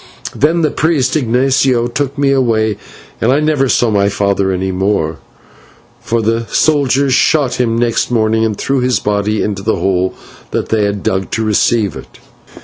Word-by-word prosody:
Then 160 Hz, +4 st, +1 dB
the 155 Hz, -, +1 dB
priest 150 Hz, -4 st, 0 dB
Ignatio 130 Hz, -1 st, +1 dB
took 135 Hz, +3 st, -3 dB
me 140 Hz, -1 st, +2 dB
away, 110 Hz, -6 st, +1 dB, 0.4 s
and 115 Hz, -, +2 dB
I 140 Hz, -, +3 dB
never 150 Hz, -3 st, +1 dB
saw 120 Hz, -2 st, +2 dB
my 100 Hz, -1 st, +2 dB
father 100 Hz, -1 st, 0 dB
any 95 Hz, +1 st, -2 dB
more, 95 Hz, -4 st, -1 dB, 0.8 s
for 115 Hz, -1 st, -2 dB
the 115 Hz, +1 st, -1 dB
soldiers 140 Hz, -3 st, +1 dB
shot 140 Hz, -1 st, +2 dB
him 115 Hz, -2 st, 0 dB
next 120 Hz, -1 st, 0 dB
morning, 110 Hz, -2 st, +1 dB
and 110 Hz, -2 st, -1 dB
threw 135 Hz, 0 st, -1 dB
his 125 Hz, 0 st, +1 dB
body 105 Hz, +1 st, -1 dB
into 100 Hz, -2 st, -3 dB
the 110 Hz, +3 st, 0 dB
hole 95 Hz, -1 st, -1 dB, 0.3 s
that -, -, -3 dB
they 110 Hz, -2 st, +1 dB
had 100 Hz, -1 st, -3 dB
dug 95 Hz, 0 st, -1 dB
to 115 Hz, -, -1 dB
receive 110 Hz, -1 st, +1 dB
it. -, -, -12 dB
115 Hz, 170 wpm, -14 LUFS, 100-135 Hz, 0.8 s, I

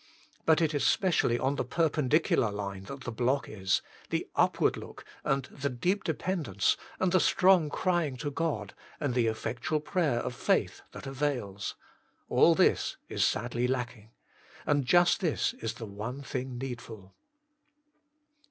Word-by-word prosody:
But 160 Hz, +1 st, +5 dB
it 160 Hz, -1 st, +2 dB
is 145 Hz, -, 0 dB
specially 170 Hz, -10 st, +3 dB
on 135 Hz, +3 st, 0 dB
the -, -, 0 dB
perpendicular 150 Hz, -3 st, +2 dB
line 100 Hz, -1 st, -5 dB
that 140 Hz, +3 st, -8 dB
the 125 Hz, -, -5 dB
block 125 Hz, +4 st, 0 dB
is 95 Hz, -3 st, 0 dB, 0.3 s
the -, -, -1 dB
upward -, -, +3 dB
look, -, -, -10 dB, 0.2 s
and 135 Hz, 0 st, +1 dB
the 140 Hz, +2 st, -4 dB
deep 180 Hz, +11 st, 0 dB
dependence, 155 Hz, -, 0 dB, 0.2 s
and 185 Hz, -1 st, +2 dB
the 185 Hz, -, +5 dB
strong 180 Hz, -5 st, +4 dB
crying 170 Hz, -5 st, 0 dB
to 145 Hz, +3 st, -3 dB
God, 135 Hz, -10 st, -2 dB, 0.3 s
and 145 Hz, -4 st, -1 dB
the 120 Hz, -2 st, +2 dB
effectual 120 Hz, +7 st, -1 dB
prayer 155 Hz, -5 st, 0 dB
of 125 Hz, -, -3 dB
faith -, -, 0 dB
that -, -, -9 dB
avails 130 Hz, -8 st, -2 dB, 0.5 s
all -, -, +5 dB
this -, -, +2 dB
is -, -, 0 dB
sadly 120 Hz, +1 st, 0 dB
lacking. 120 Hz, -4 st, -3 dB, 0.6 s
And 145 Hz, -2 st, +2 dB
just 175 Hz, +2 st, +5 dB
this 170 Hz, -6 st, 0 dB
is 115 Hz, 0 st, -3 dB
the 115 Hz, -, -7 dB
one 110 Hz, +7 st, -6 dB
thing 130 Hz, -1 st, -4 dB
needful. 115 Hz, -6 st, -7 dB
130 Hz, 150 wpm, -30 LUFS, 115-155 Hz, 0.6 s, But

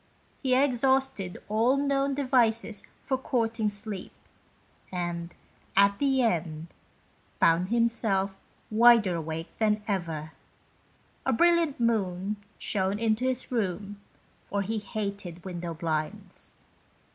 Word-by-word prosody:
He 260 Hz, -2 st, +2 dB
exhausted 265 Hz, -7 st, +1 dB
all 230 Hz, +6 st, +3 dB
the 280 Hz, -, +1 dB
known 275 Hz, -1 st, +1 dB
devices 235 Hz, -5 st, +1 dB, 0.2 s
for 265 Hz, -1 st, -1 dB
courting 230 Hz, -4 st, 0 dB
sleep, 205 Hz, -2 st, -6 dB, 0.8 s
and, 175 Hz, -1 st, -3 dB, 0.4 s
at 200 Hz, 0 st, +5 dB
the 270 Hz, -2 st, +3 dB
end, 165 Hz, -6 st, -1 dB, 0.7 s
found 170 Hz, +2 st, +4 dB
himself 220 Hz, -4 st, +1 dB, 0.4 s
wider 225 Hz, -3 st, +6 dB
awake 165 Hz, 0 st, -5 dB
than 210 Hz, -1 st, +2 dB
ever. 165 Hz, -6 st, -2 dB, 0.9 s
A 265 Hz, -, +1 dB
brilliant 335 Hz, +2 st, +3 dB
moon 205 Hz, -3 st, 0 dB, 0.2 s
shone 195 Hz, 0 st, -1 dB
into 225 Hz, +2 st, +1 dB
his 260 Hz, 0 st, -2 dB
room, 200 Hz, -2 st, -2 dB, 0.5 s
for 200 Hz, 0 st, 0 dB
he 220 Hz, +3 st, -2 dB
hated 200 Hz, -4 st, -5 dB
window 175 Hz, -2 st, -5 dB
blinds. 155 Hz, -2 st, -4 dB
210 Hz, 110 wpm, -28 LUFS, 180-240 Hz, 0.9 s, wider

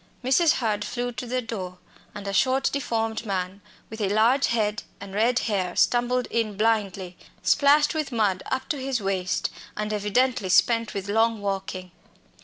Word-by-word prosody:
Mrs. 300 Hz, +6 st, +4 dB
Hurd 215 Hz, -4 st, -1 dB
flew 245 Hz, +2 st, -3 dB
to 245 Hz, +1 st, -6 dB
the 250 Hz, +1 st, -1 dB
door, 185 Hz, -5 st, -6 dB, 0.4 s
and 205 Hz, -1 st, -7 dB
a 200 Hz, -, -2 dB
short, 265 Hz, +4 st, +2 dB
deformed 225 Hz, -5 st, -1 dB
man, 190 Hz, -2 st, -3 dB, 0.3 s
with 220 Hz, 0 st, -6 dB
a 200 Hz, -, +1 dB
large 230 Hz, +7 st, +3 dB
head 215 Hz, -1 st, 0 dB, 0.2 s
and 200 Hz, -1 st, -9 dB
red 230 Hz, +4 st, +2 dB
hair, 190 Hz, -7 st, -1 dB
stumbled 245 Hz, +1 st, +2 dB
in 215 Hz, -3 st, -1 dB
blindly, 200 Hz, -5 st, 0 dB, 0.3 s
splashed 295 Hz, +1 st, +4 dB
with 305 Hz, -3 st, -2 dB
mud 205 Hz, -5 st, +1 dB
up 260 Hz, -, -2 dB
to 295 Hz, -4 st, -1 dB
his 265 Hz, -2 st, -1 dB
waist, 190 Hz, -2 st, -1 dB, 0.3 s
and 210 Hz, 0 st, -2 dB
evidently 210 Hz, +1 st, +1 dB
spent 230 Hz, +3 st, +3 dB
with 195 Hz, -1 st, -4 dB
long 225 Hz, +2 st, +2 dB
walking. 195 Hz, -2 st, -4 dB
220 Hz, 165 wpm, -25 LUFS, 200-245 Hz, 0.4 s, Mrs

